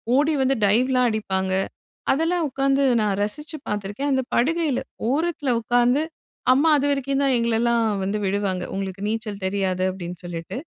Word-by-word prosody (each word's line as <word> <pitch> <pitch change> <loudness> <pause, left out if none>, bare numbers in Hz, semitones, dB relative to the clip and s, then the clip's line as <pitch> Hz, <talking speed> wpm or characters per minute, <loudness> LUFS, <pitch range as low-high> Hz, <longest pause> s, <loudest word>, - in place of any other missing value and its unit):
ஓடி 295 +3 +3
வந்து 265 +1 +2
டைவ் 230 +6 +3
எல்லாம் 250 -1 +3
அடிப்பாங்க. 190 -3 -1 0.6
அதெல்லாம் 325 +4 +1
உக்காந்து 275 +1 +1 0.2
நான் 200 -2 0
ரசிச்சு 300 +10 -4
பாத்திருக்கேன். 210 +7 -2
அந்த 265 -1 +2
படுகையில, 305 +1 +1 0.3
ஓரத்தில 305 -1 -1
உக்காந்து 245 +4 +3 0.5
அம்மா 290 +5 +3
அதுவரைக்கும் 275 -1 0
தான் 270 -2 +3
எங்களைல்லாம் 235 0 +2 0.2
வந்து 200 +2 -1
விடுவாங்க, 190 -2 -1
"உங்களுக்கு 195 0 -4
நீச்சல் 215 -3 -4
தெரியாது" 190 -1 0
அப்படின்னு 180 -2 -7
சொல்லிட்டு. 170 +7 -5
235 Hz, 140 wpm, -23 LUFS, 200-275 Hz, 0.6 s, ஓடி